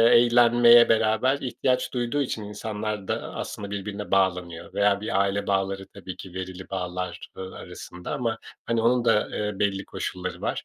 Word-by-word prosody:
eğlenmeye 120 0 +7
beraber 110 +4 +3
ihtiyaç 130 -1 -1
duyduğu 125 +3 0
için 115 -5 -3
insanlar 105 -1 -4
da, - - -3
aslında, 100 -1 -5
birbirine 100 +1 -5
bağlanıyor 90 -2 0
veya 100 0 +3
bir 100 -2 0
aile 100 +1 0
bağları 95 0 0
tabii 95 -2 -9
ki 95 -1 -10
verili 95 0 -6
bağlar, 90 -1 -4
ııı, 95 0 -7
arasında 90 0 -8
ama, 115 -2 -1 0.3
hani, 115 -1 +1
onun 120 +1 +3
da, 115 -3 +3
eee, 105 -2 -3
belli 100 -1 0
koşulları 90 0 -5
var. - - -2
105 Hz, 160 wpm, -25 LUFS, 95-115 Hz, 0.3 s, eğlenmeye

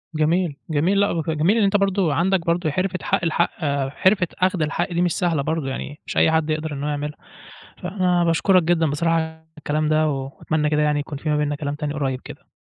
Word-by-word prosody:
جميل، 160 +1 +1
جميل 165 +6 +2
لأ، 200 - +3
وف 165 -1 -2
جميل 160 +6 +2
اللي 225 -3 +3
أنت 200 +1 +3
برضه 195 -5 +1
عندك 175 +2 +1
برضه 170 -1 +1
حِرفة 185 +4 -1
حق - - +1
الحق 170 +1 +1 0.4
حرفة 185 +6 +2
أخْد 185 -2 +1
الحق 155 +3 -1
دي 170 - +1
مش 175 -1 +2
سهلة 170 -6 +1
برضه، 160 0 -2
يعني 140 +2 -5
مش - - -4
أي - - +5
حد 160 -1 +1
يقدر 155 0 -2
إن 140 - -5
هو 150 - -1
يعملها. 150 0 -4 0.7
فأنا 180 -2 +1
باشكرك 175 +2 +3
جدًا 165 -1 +2
بصراحة 165 +3 0
على 160 0 -3
الكلام 155 0 -1
ده، 155 0 +3
وأتمنى 145 +2 -2
كده 150 0 +1
يعني 150 -1 +2
يكون 145 0 -5
في 155 +2 -4
ما 150 - +2
بيننا 150 0 0
كلام 145 0 -4
تاني 150 0 -3
قريّب 135 -4 -2
كده. - - -12
160 Hz, 220 wpm, -22 LUFS, 150-175 Hz, 0.7 s, أي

